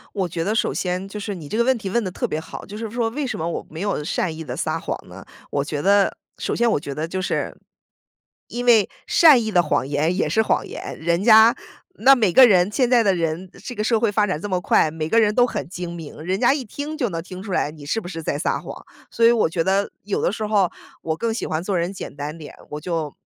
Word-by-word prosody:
我 190 -3 -1
觉 165 0 -3
得 210 - 0
首 - - +1
先 180 +1 -2
就 210 +2 -7
是 205 0 -4
你 160 -6 -9
这 215 - -2
个 235 - +4
问 260 +2 +3
题 210 -5 -5
问 235 +4 0
得 185 - -4
特 - - -2
别 155 - -2
好， 160 - -9
就 205 - -9
是 225 0 -5
说 230 -1 0
为 285 +5 -3
什 255 - -3
么 165 +2 -2
我 - - -4
没 160 +3 -7
有 200 -7 -1
善 160 +1 -2
意 160 - -7
地 - - -6
撒 - - -2
谎 - - -3
呢？ - - -11 0.2
我 140 - -1
觉 145 0 -4
得 200 +1 +3 0.2
首 - - -2
先 235 0 +2
我 215 - +1
觉 140 -3 -6
得 155 +2 -3
就 185 +3 -4
是， 185 - -2 0.9
因 245 +1 -4
为 230 -4 +5 0.2
善 300 -8 +7
意 220 - -3
的 175 -3 +4
谎 135 -4 0
言 150 +5 0
也 195 - 0
是 220 0 +2
谎 - - 0
言， - - -7
人 170 +3 0
家 225 +2 +7 0.4
那 270 -5 +6
每 220 -9 +2
个 260 - +9
人 185 -2 +4
现 250 +3 +2
在 245 -1 +4
的 195 -4 +2
人， 170 +2 -2 0.2
这 250 - -5
个 210 - -2
社 225 0 +2
会 225 -3 +1
发 210 0 +2
展 185 -6 -2
这 205 - -5
么 185 -2 -1
快， 155 - +3
每 160 0 -4
个 230 - +4
人 210 -2 +3
都 245 +2 +4
很 145 - -4
精 175 -1 -6
明， 155 -2 -9
人 185 +4 -2
家 250 +2 +4
一 285 - -3
听 285 +7 -6
就 250 -8 -1
能 165 - -4
听 185 0 -9
出 200 - -7
来 150 - 0
你 150 -1 -13
是 155 +10 -1
不 190 - -9
是 165 -2 -6
在 145 - -2
撒 155 - -1
谎。 - - -10 0.2
所 230 - +2
以 235 - +7
我 225 -8 +2
觉 165 0 -1
得 195 +2 +1
有 205 -1 -2
的 - - +1
时 215 0 -3
候 205 -4 +2 0.3
我 160 0 -2
更 230 -1 -1
喜 225 - -3
欢 160 +1 -2
做 195 +1 -1
人 175 +2 -1
简 190 - -8
单 150 +3 -5
点， 150 -2 -10
我 150 - -5
就 160 -3 -3
190 Hz, 295 characters per minute, -22 LUFS, 165-225 Hz, 0.9 s, 个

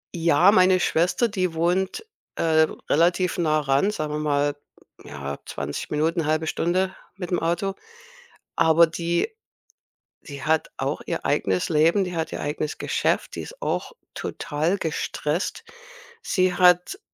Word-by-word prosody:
Ja, 170 +3 +5
meine 185 -2 +5
Schwester, 180 +10 +2
die 185 -5 -1
wohnt, 185 - 0 0.3
äh, 160 -1 +3 0.2
relativ 175 +3 +2
nah 155 -3 +2
ran, 140 +8 +2
sagen 155 -6 -3
wir 150 - -2
mal, 145 -1 +1 0.5
ja, 70 0 -6
20 - - -5
Minuten, 160 +2 0
1/2 155 +1 0
Stunde 185 +4 0 0.2
mit'm 180 -1 -2
Auto. 175 +4 -1 0.8
Aber 160 +1 +5
die 170 - -1 0.9
die 140 -3 -9
hat 160 +1 +1
auch - - -2
ihr - - -3
eigenes 95 -1 0
Leben. 165 +5 +3
Die 180 -2 -5
hat 160 - -2
ihr - - -4
eigenes 150 +1 -3
Geschäft. - - -1
Die - - -4
ist - - -12
auch - - -2 0.2
total 160 +6 -2
gestresst. 160 -1 -3 0.6
Sie 185 - +1
hat, 180 - +4
165 Hz, 135 wpm, -24 LUFS, 155-185 Hz, 0.9 s, Ja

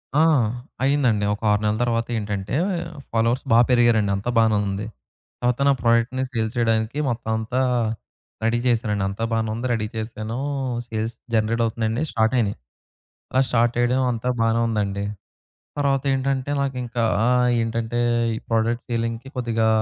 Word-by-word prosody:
ఆ! - - +4 0.6
అయిందండి. 130 -7 +2
ఒక 105 - -7
6 105 - +2
నెలల 105 0 +1
తర్వాత 115 -1 0
ఏంటంటే 100 +1 -3 0.6
ఫాలోవర్స్ 115 +2 +1
బా 115 - +7
పెరిగారండి. 120 -4 +4
అంతా 100 +5 -3
బానే 110 -1 +4
ఉంది. 100 +2 -3 0.5
తర్వాత 125 +1 0
నా 140 - +6
ప్రొడక్ట్‌ని 115 +2 +2
సేల్ 110 -2 -1
చేయడానికి 115 +3 +1
మొత్తం 115 -2 -3
అంతా 115 +3 -2 0.8
రెడీ 115 +1 +2
చేసానండి. 110 -4 +1
అంతా 100 +4 -5
బాగానే 110 -1 0
ఉంది 120 +3 -4
రెడీ 105 -2 -1
చేసానూ. 110 +1 -4 0.5
సేల్స్ 110 +1 -3 0.2
జనరేట్ 115 +1 +1
అవుతున్నాయండి. 115 +4 -1
స్టార్ట్ 110 +1 +1
అయినాయి. 105 -3 0 0.7
అలా 130 - +3
స్టార్ట్ 120 0 +2
చేయడం 120 +2 +2
అంతా 120 +1 -2
బానే 115 0 +2
ఉందండి. 100 -2 -1 0.7
తర్వాతేంటంటే 135 -1 0
నాకింకా 125 -3 -2 0.2
ఆ! - - +3 0.3
ఏంటంటే 115 +1 -2 0.4
ఈ - - -4
ప్రొడక్ట్ 115 +2 +1
సేలింగ్‌కి 115 +2 -2
కొద్దిగా 115 -2 +1
115 Hz, 140 wpm, -23 LUFS, 110-120 Hz, 0.8 s, బా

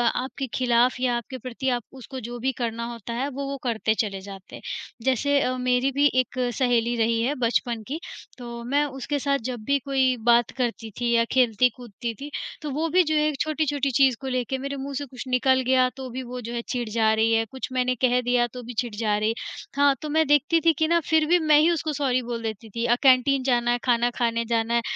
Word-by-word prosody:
आपके 265 +1 -3
खिलाफ़ 245 0 +3
या 245 -2 +2
आपके 260 +3 -7
प्रति 255 +2 -4
आप 245 -3 -1
उसको 260 0 -8
जो 240 0 -7
भी 265 +3 0
करना 230 0 -2
होता 235 0 -7
है 255 +4 -1
वो 280 0 -5
वो 275 - -3
करते 225 -3 0
चले 195 -4 -1
जाते 195 -1 -10
हैं। - - -11 0.4
जैसे 280 +2 +2
अ, 255 -1 0
मेरी 250 +1 +1
भी 285 +2 +4
एक 255 +1 -8 0.2
सहेली 240 -2 +2
रही 230 0 +2
है 280 +4 0
बचपन 235 -1 0
की, 305 +5 -4 0.4
तो 235 -1 -7
मैं 280 +5 +1
उसके 275 +1 -3
साथ 280 0 +1
जब 240 -3 -5
भी 280 0 +2
कोई 265 -2 +2
बात 235 0 +4
करती 235 -3 -2
थी 240 -1 0
या 230 0 +4
खेलती-कूदती 240 -1 +1
थी 285 +5 -8 0.3
तो 300 - -4
वो 315 +4 -1
भी 365 +3 +4
जो 315 -1 -1
है 300 0 +2
छोटी-छोटी 290 -3 0
चीज़ 260 0 +4
को 265 - -5
लेके 255 0 -1
मेरे 275 +1 -4
मुँह 275 +1 -5
से 285 +1 -3
कुछ 255 -1 -8
निकल 260 +1 +3
गया 255 -1 +4
तो 260 -1 -6
भी 260 +2 -4
वो 250 +1 -7
जो 235 +1 -6
है 235 - -2
चिढ़ 240 -3 -2
जा 220 0 +2
रही 225 +1 +2
है 225 0 +2
कुछ 265 - -5
मैंने 255 0 +1
कह 250 -1 +3
दिया 245 0 +2
तो 250 - -7
भी 240 +1 -7
चिढ़ 235 -4 -3
जा 210 -1 0
रही 215 +1 +1
है। 225 - +1 0.4
हाँ, 285 -1 +5
तो 305 - -5
मैं 315 +1 +3
देखती 295 +3 +3
थी 330 - +6
कि 315 - +2
ना 340 0 +3
फिर 315 -1 +4
भी 350 +1 +4
मैं 310 -2 +4
ही 320 - +4
उसको 315 -2 -1
सॉरी 260 -3 +1
बोल 235 -1 -5
देती 220 0 -5
थी। 230 +3 -3
अ, 240 0 +4
कैंटीन 265 0 +4
जाना 240 -2 +2
है, 245 - +2
खाना 240 -1 +3
खाने 230 -1 0
जाना 230 0 0
है 235 - +3
250 Hz, 240 wpm, -25 LUFS, 235-275 Hz, 0.4 s, थी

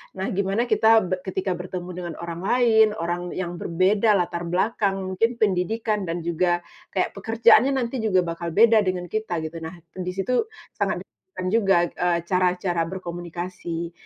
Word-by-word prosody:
Nah, 190 0 -3
gimana 200 +4 0
kita 220 - +3 0.2
be 185 -1 -1
ketika 190 0 -2
bertemu 180 0 -6
dengan 175 -3 -5
orang 170 0 -5
lain, 230 -3 +5
orang 175 -3 -2
yang 175 -2 -4
berbeda 200 +5 +2
latar 175 -2 -1
belakang, 195 +3 0 0.2
mungkin 205 +5 +2
pendidikan 210 +1 0
dan 165 0 -3
juga 175 +1 0 0.3
kayak, 185 - +1
pekerjaannya 230 +5 +4
nanti 250 -1 -2
juga 185 -4 +3
bakal 170 0 -4
beda 225 +1 +6
dengan 180 -1 -1
kita 185 -7 -2
gitu. 160 +1 -6
Nah, 160 - -7 0.3
di 180 - -2
situ 250 - 0 0.3
sangat - - -1
de - - -49 0.3
kan 185 - -3
juga, 205 -4 +3 0.2
eee, 175 -1 0
cara-cara 180 -1 +1
berkomunikasi. 175 -1 -5
185 Hz, 160 wpm, -24 LUFS, 175-215 Hz, 0.3 s, beda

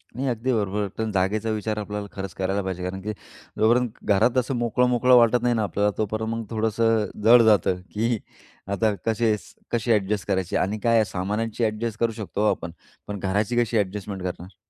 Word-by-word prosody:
नाही, 135 +3 -2
अगदी 125 +2 -1
बरोबर. 105 -2 0
पण 110 -1 -2
जागेचा 100 +3 0
विचार 110 0 -2
आपल्याला 105 -1 -4
खरंच 95 -3 -6
करायला 95 +1 -1
पाहिजे 95 -1 -4
कारण 95 +1 -4
की 105 +3 -3 0.5
जो 110 - +4
पर्यंत 125 +1 +3
घरात 110 +5 +3
असं 130 +1 +1
मोकळं-मोकळं 125 +1 +3
वाटत 120 0 +4
नाही 120 -1 +2
ना 110 - +1
आपल्याला, 105 +1 +1
तोपर्यंत 110 +1 -2
मग 115 0 -4
थोडंसं 110 0 +1 0.2
जड 120 +2 +8
जातं, 95 -4 +3
की 115 +2 0 0.5
आता 100 +2 +1
कसे-कसे 115 +1 -1
अ‍ॅडजस्ट 105 0 0
करायची 95 -3 -1
आणि 105 +3 -1
काय 115 -1 +3
आहे 110 -1 +4
सामानांची 105 +5 -2
अ‍ॅडजस्ट 110 0 -2
करू 115 -1 +2
शकतो 105 -2 -5
हो 105 - +4
आपण, 85 - -4 0.4
पण 105 -1 -5
घराची 100 +5 0
कशी 115 -1 0
अ‍ॅडजस्टमेंट 100 -1 -3
करणार. 90 0 -6
110 Hz, 185 wpm, -24 LUFS, 100-115 Hz, 0.5 s, जड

